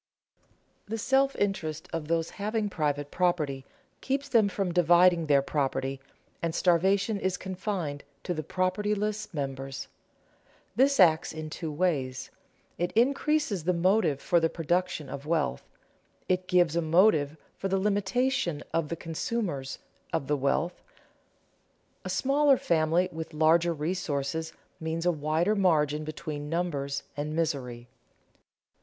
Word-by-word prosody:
The 225 +2 -3
self 270 +4 +2
interest 160 -6 -2
of 165 -2 -3
those 165 0 0
having 210 +1 -2
private 145 -3 -1
property 155 -7 0 0.4
keeps 275 +1 -1
them 230 -6 +4
from 195 -2 -2
dividing 175 -1 +5
their 140 -2 +4
property, 135 -2 -1 0.4
and 165 -1 -2
starvation 195 +4 +2
is 190 -1 -1
confined 185 -6 -4 0.2
to 180 - -2
the 155 - -3
propertyless 205 +5 -1
members. 135 -3 -5 0.9
This 275 +3 +3
acts 165 -3 +5
in 155 -1 -7
two 160 0 -4
ways: 140 -6 -1 0.5
it 175 +1 0
increases 270 - +1
the 180 +2 +2
motive 180 -4 +2
for 175 - +2
the 165 0 +2
production 175 -1 -1
of 140 +2 -7
wealth; 155 -4 -1 0.6
it 185 0 0
gives 175 -3 +3
a 170 - +2
motive 160 -3 +3 0.2
for 195 - -3
the 195 0 +1
limitation 205 - 0
of 165 -3 0
the 170 - -2
consumers 165 - -3 0.3
of - - -1
the 150 +2 +1
wealth. 145 +5 -1 1.2
A - - -5
smaller 275 0 +3
family 170 0 +2
with 160 -1 -7
larger 165 +2 +4
resources 160 -1 -2 0.3
means 160 +1 -3
a 175 - +4
wider 160 +6 +1
margin 155 -6 +2
between 150 -1 -5
numbers 145 -5 -2
and 150 +1 -3
misery. 125 -7 -2
170 Hz, 130 wpm, -28 LUFS, 150-195 Hz, 1.2 s, dividing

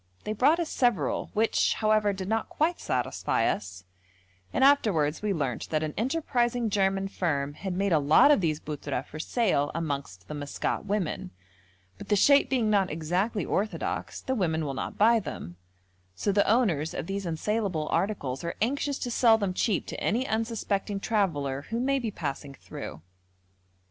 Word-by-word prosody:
They 215 - -2
brought 290 +10 +3
us 340 - -1
several, 240 -6 +1
which, 220 +1 +2
however, 215 -1 +2
did 190 -1 -5
not 220 +2 -1
quite 330 +3 0
satisfy - - -1
us, 95 -3 -3 0.7
and - - +1
afterwards 195 - +3
we 210 -1 0
learnt 140 - -2
that 155 -1 0
an 155 -1 -3
enterprising 240 -3 0
German 195 -1 +1
firm 145 -7 -1
had 185 +3 -5
made 200 0 +1
a 160 - +4
lot 150 - +6
of 285 - +4
these 155 -3 0
buttra 145 -4 -4
for 155 - -9
sale 175 - +1
amongst 140 - -4
the - - -6
Maskat 145 -1 -3
women; 195 - -2 0.7
but - - -9
the 210 - +4
shape 280 +6 +5
being 250 -4 +1
not 200 -3 +2
exactly 180 +8 -1
orthodox, 210 +3 -2
the 260 - -2
women 160 -8 0
will 140 - -3
not - - -5
buy 230 +2 +5
them, 85 - -7 0.6
so 205 - 0
the 200 0 +2
owners 185 - +2
of - - -3
these 195 0 -3
unsaleable 175 -1 -1
articles 145 -11 -1
are 170 - -3
anxious 280 +4 0
to 245 - -4
sell 230 -1 +5
them 200 -4 -1
cheap 200 +1 0
to - - -7
any 240 +5 +1
unsuspecting 220 -3 -1
traveller 150 -11 0
who 230 - -1
may 275 +2 +1
be 235 -3 -2
passing 140 -6 -5
through. 80 - -9
195 Hz, 170 wpm, -28 LUFS, 155-225 Hz, 0.7 s, lot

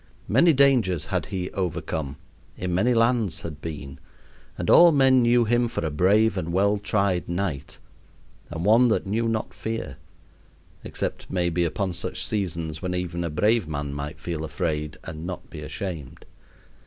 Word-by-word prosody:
Many 135 +10 +5
dangers 125 - +3
had - - -2
he 90 -1 -4
overcome, 80 -6 -3 0.4
in 90 -1 -3
many 115 +7 +2
lands 115 -5 +2
had 75 -3 -7
been; 75 -4 -7 0.6
and - - -3
all 170 0 +8
men 135 -3 +5
knew 120 0 +4
him 120 +2 +2
for 100 - -3
a 80 - -2
brave 100 +6 +3
and 85 -1 -4
well 100 +3 +2
tried 100 -4 0
knight, 85 -6 -3 0.7
and 85 +2 -4
one 115 +4 +6
that 110 - +1
knew 110 +4 0
not 110 -1 -2
fear; 110 - -5 0.9
except, - - -4
maybe, 85 -1 0
upon 95 +2 -2
such - - -3
seasons 85 -7 -3
when 90 -1 -2
even 85 -1 -3
a 85 - -2
brave 105 +5 +2
man 70 -2 -4
might 70 +3 -6
feel 85 -3 -4
afraid 75 -1 -3
and 80 -1 -7
yet 80 - -7
not 90 - -7
be 80 -2 -8
ashamed. 80 - -6
90 Hz, 165 wpm, -25 LUFS, 80-110 Hz, 0.9 s, all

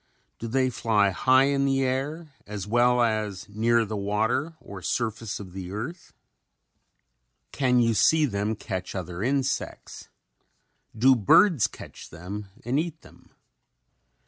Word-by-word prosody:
Do 115 - -5
they 130 +2 +1
fly 105 -4 +2
high 130 +7 +4
in 140 0 +1
the 135 -1 +1
air 140 +4 -3
as 105 -3 -5
well 120 +2 +3
as 110 -4 -2
near 115 +3 +1
the 110 +1 -5
water 110 +10 -1
or 100 -2 -10
surface 110 0 -3
of 95 -3 -10
the 95 -2 -7
earth? 125 - -6 1.4
Can 125 -2 +2
you 115 -1 +3
see 155 +8 +4
them 105 -3 -2
catch 95 -3 -5
other 90 -1 -5
insects? 135 +3 -2 0.9
Do 130 +4 +5
birds 130 - +4
catch - - -12
them 95 +6 -7 0.2
and 130 +4 +1
eat 160 -1 -4
them? - - -19
115 Hz, 135 wpm, -26 LUFS, 100-135 Hz, 1.4 s, Do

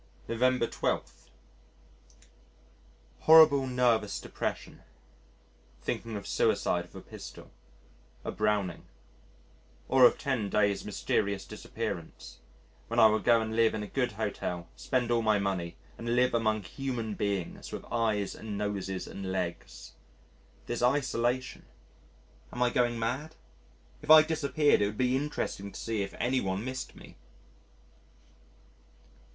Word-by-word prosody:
November 125 +1 +2
12. - - -3 1.9
Horrible 155 -4 +7
nervous 120 -5 +1
depression. - - -5 1.0
Thinking 115 -1 -3
of 100 -1 -6
suicide - - +1
with - - -20
a - - -8
pistol - - -10 0.7
a - - -2
Browning. 105 -4 -1 1.0
Or 130 -1 +6
of - - +5
10 130 -8 -1
days' 100 -1 +1
mysterious 100 -1 -1
disappearance, 105 -4 -6 0.5
when - - 0
I - - +8
will 110 0 +5
go 115 -2 +4
and 110 0 -3
live 115 -1 +3
in 105 - -3
a - - -6
good 125 0 -1
Hotel, 100 -5 -3
spend 120 - -1
all 120 -1 +3
my 110 -2 +3
money, 95 -4 -2 0.2
and 115 +1 -1
live 125 +1 +3
among 110 -2 +1
human 115 +2 -4
beings 100 -4 -3
with - - -6
eyes 110 -4 0
and 105 -2 -6
noses 100 -2 -3
and 95 -1 -6
legs. 85 -9 -5 0.7
This 120 - -3
isolation. 125 -1 0 0.9
Am 125 - 0
I 125 - +2
going 120 -1 +1
mad? 135 +8 -3 0.7
If - - -12
I 155 0 +10
disappeared, 155 -4 +2
it 100 - +3
would 105 +1 -6
be 125 0 +2
interesting 130 -8 -3
to - - -9
see 115 -2 -2
if 100 - -5
any 130 +1 +1
one 95 +3 -2
missed 130 0 -5
me. - - -14
115 Hz, 130 wpm, -30 LUFS, 100-125 Hz, 1.9 s, I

